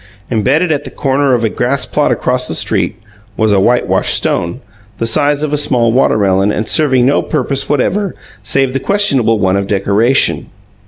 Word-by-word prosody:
Embedded 135 - +1
at 145 -1 -1
the - - -8
corner 135 -1 0
of 120 - -2
a - - +2
grassplot 135 +5 -1
across 125 0 0
the 80 - -2
street - - 0 0.4
was 110 -1 +1
a 100 - +3
whitewashed 120 +5 +1
stone, 85 0 -1 0.4
the 115 - -2
size 145 +5 +1
of 150 -1 -3
a - - +2
small 125 -5 +2
watermelon 100 -5 +1
and 110 +1 -3
serving 130 -5 +2
no 140 +3 +2
purpose 135 -2 -2
whatever 185 +8 -1 0.3
save 135 -2 0
the 135 - -1
questionable 135 - +2
one 95 -2 0
of 100 0 -2
decoration. 105 +6 +1
130 Hz, 170 wpm, -13 LUFS, 110-145 Hz, 0.4 s, a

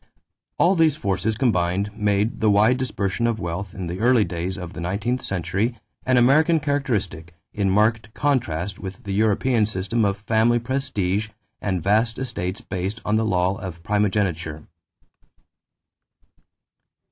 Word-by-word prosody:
All 180 - +4
these 160 -4 +4
forces 100 - -1
combined 100 -3 0
made 105 +1 0
the 110 - +4
wide 105 +5 +4
dispersion 115 -4 -1
of 115 -2 -1
wealth, 90 +4 -4
in 95 -2 -4
the 85 +2 -5
early 120 0 +4
days 90 +1 -4
of 90 -1 -7
the 85 - -6
nineteenth 105 +8 -1
century, 100 +6 -2 0.3
an 130 -1 +4
American 155 +7 +4
characteristic, 110 - -2 0.2
in 100 -2 0
marked 110 +2 +2
contrast 100 - -1
with 95 -1 -8
the 100 - -4
European 110 +2 +2
system 110 +3 -1
of 100 -1 +1
family 110 +3 +2
prestige 115 -5 -1 0.3
and 95 -5 -1
vast 110 +3 +2
estates 100 -7 -4
based 95 +4 -4
on 105 - +1
the 110 +1 +2
law 95 -1 +1
of 85 -3 -7
primogeniture. 95 -6 -1
105 Hz, 140 wpm, -23 LUFS, 95-115 Hz, 0.3 s, All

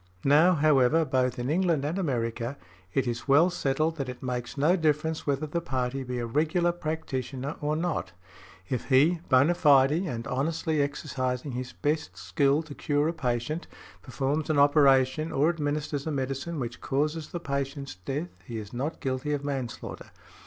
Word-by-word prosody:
Now, 155 +6 +6
however, 150 0 +4
both 130 -2 0
in 125 +3 -2
England 165 -4 +1
and 165 +6 -1
America, 120 -4 -2 0.3
it 135 +6 +1
is 120 +1 -3
well 155 +6 +5
settled 155 0 0
that 135 -3 -3
it 125 0 -8
makes 125 +1 -4
no 155 +6 +4
difference 160 -1 0
whether 140 +2 0
the 170 +3 -2
party 130 -3 -2
be 125 -1 -4
a 120 - -2
regular 160 +7 +1
practitioner 145 -4 -4
or 150 +1 0
not; 155 - -2 0.6
if 125 +1 -2
he, 150 +6 +4
bona 140 +6 +5
fide 140 -5 +5
and 150 -8 -2
honestly 155 +3 0
exercising 135 -2 -2
his 125 0 -5
best 145 - -2
skill 135 - +1
to 160 -2 -9
cure 145 +1 0
a - - -2
patient, 130 +2 -2 0.3
performs 140 +3 -2
an 155 - +2
operation 140 +1 +4
or 145 +4 +3
administers 150 -2 -2
a - - -1
medicine 135 +4 -3
which 120 -2 -5
causes 150 +3 -1
the 175 - -5
patient's 140 - -3
death 135 - -4 0.2
he 120 -4 -6
is 105 0 -7
not 140 +7 -3
guilty 130 +2 -1
of 145 -1 -2
manslaughter. 135 -4 -5
140 Hz, 165 wpm, -28 LUFS, 130-155 Hz, 0.6 s, Now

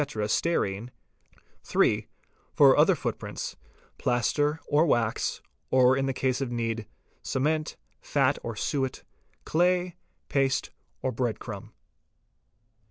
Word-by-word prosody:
stearine; 110 -4 0 0.7
(3) - - +2 0.5
for - - +7
other - - +5
footprints: - - -4 0.4
plaster, 145 +6 +1
or 150 +2 +4
wax, 115 -5 0 0.3
or 130 0 +5
in 135 0 0
case 130 +1 0
of 130 -3 -2
need—cement, 120 +6 -3 0.3
fat 140 -1 +1
or 115 -1 -5
suet, 135 +3 -2 0.4
clay, 180 +1 +2 0.3
paste, 135 -1 +1 0.3
or 130 - +1
bread 120 -1 -1
crumb. - - -8
130 Hz, 100 wpm, -27 LUFS, 120-150 Hz, 0.7 s, for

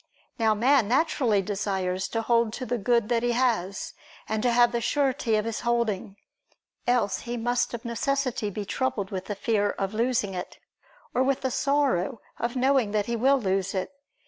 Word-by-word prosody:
Now 220 -1 +3
man 245 +1 +3
naturally 245 -6 +2
desires 190 -2 -2
to 225 0 -2
hold 230 -1 +2
to 255 - -4
the 245 0 -2
good 235 +1 +2
that 235 -1 +2
he 240 0 +1
has, 225 -6 0 0.3
and 220 0 -1
to 245 - +2
have 240 0 +5
the 235 - -1
surety 265 -4 +1
of 215 0 0
his 230 -1 -3
holding: 235 -5 -1 0.7
else 245 -5 +2
he 240 0 -5
must 240 +1 0
of 235 +1 -9
necessity 245 -1 -1
be 205 +1 -5
troubled 205 -4 -2
with 190 -1 -4
the 205 - -4
fear 205 0 +1
of 195 0 -3
losing 235 -2 0
it, 180 -1 -6 0.6
or 255 - +2
with 265 0 +1
the 260 - -1
sorrow 265 -7 +1 0.2
of 235 +2 -2
knowing 255 -4 +2
that 210 -1 +1
he 235 - -2
will 270 +4 +3
lose 195 -2 -1
it. 185 +5 -2
230 Hz, 185 wpm, -26 LUFS, 205-250 Hz, 0.7 s, have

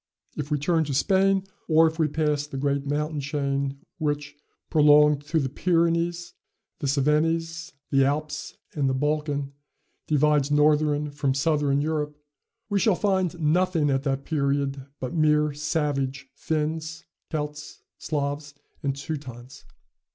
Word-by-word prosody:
If 150 -1 -4
we 150 - +1
turn 160 +3 +1
to 140 -2 -3
Spain; 195 +4 +3 0.2
or 160 0 +5
if 160 0 -1
we 160 - +3
pass 150 -1 0
the 135 - -6
great 140 0 -1
mountain 150 +1 -1
chain, 140 -1 -2 0.2
which, 145 -1 -2 0.4
prolonged 150 -1 +5
through 155 +2 0
the 135 - 0
Pyrenees, 170 +3 0 0.5
the 140 - -2
Cevennes, 165 +4 0 0.2
the 135 -1 +4
Alps, 150 +2 -2 0.2
and 140 -3 +1
the 130 - 0
Balkan, 145 0 -1 0.5
divides 150 -1 +3
Northern 150 0 +2
from 140 -2 -1
Southern 145 -1 +1
Europe, 150 -1 -2 0.5
we 205 -2 +1
shall 210 -1 +3
find 185 -3 0
nothing 165 -1 +2
at 135 0 +1
that 135 -1 -2
period 140 -2 -1
but 130 - -4
mere 150 -2 +3
savage 145 -3 -2
Finns, 160 +1 -3 0.2
Celts, 150 -1 -5 0.2
Slavs, 145 -1 -3 0.3
and 140 -3 -1
Teutons. 135 -4 -7
150 Hz, 135 wpm, -25 LUFS, 140-160 Hz, 0.5 s, or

